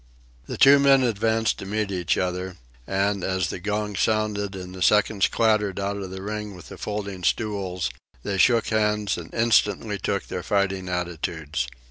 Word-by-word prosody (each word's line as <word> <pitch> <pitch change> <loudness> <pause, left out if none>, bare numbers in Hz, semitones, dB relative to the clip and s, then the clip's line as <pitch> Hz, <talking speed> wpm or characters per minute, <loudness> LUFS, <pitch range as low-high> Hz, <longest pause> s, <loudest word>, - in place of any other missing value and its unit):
The - - -5
two 140 +1 +7
men 135 -1 +5
advanced 110 -1 +1
to - - -6
meet 105 0 -1
each 90 -3 0
other, 90 0 -2 0.3
and, 100 0 0
as 95 -1 0
the - - -5
gong 105 +2 -2
sounded 105 -2 0
and 90 -1 -7
the 95 - -9
seconds 105 +1 +3
clattered 105 -4 +1
out 100 +1 -2
of 95 -2 -5
the 95 +1 -7
ring 105 -1 -5
with 90 - -12
the - - -9
folding 100 -3 -4
stools, 95 - -1 0.3
they 100 -1 -2
shook 115 +2 +4
hands 105 -2 +1
and 85 -1 -8
instantly 105 -3 +2
took - - -2
their - - -5
fighting 95 -2 0
attitudes. 80 -6 -3
100 Hz, 170 wpm, -24 LUFS, 95-105 Hz, 0.3 s, two